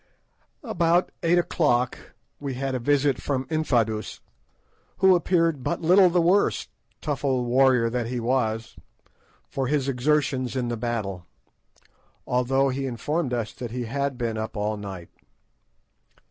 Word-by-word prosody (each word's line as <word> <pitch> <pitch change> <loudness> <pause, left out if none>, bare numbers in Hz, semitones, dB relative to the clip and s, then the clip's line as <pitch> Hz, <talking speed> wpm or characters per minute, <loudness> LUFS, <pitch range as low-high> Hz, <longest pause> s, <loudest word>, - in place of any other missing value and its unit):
About 175 -6 +1
eight 170 0 +3
o'clock 130 -8 0 0.2
we 140 -3 -4
had 135 +1 -2
a 130 - -1
visit 140 +1 +1
from 135 -2 -2
Infadoos, 115 -9 0 0.8
who 190 0 +6
appeared 165 -5 +1
but 170 - -2
little 185 +3 +6
the 175 +1 +2
worse—tough 165 -5 -1
old 130 -3 +1
warrior 125 -1 +4
that 120 0 -2
he 125 +1 -3
was—for 115 +2 -4
his 140 -1 0
exertions 135 -1 0
in 125 -2 -1
the 120 - -1
battle, 110 -7 -4 1.0
although 135 +2 +1
he 135 +1 -2
informed 135 +4 -2
us 115 -3 -2
that 120 -2 -6
he 120 +1 -4
had 140 +2 -2
been 115 -3 -2
up 110 0 -5
all 105 +1 -1
night. 95 -4 -8
130 Hz, 130 wpm, -25 LUFS, 120-150 Hz, 1.0 s, who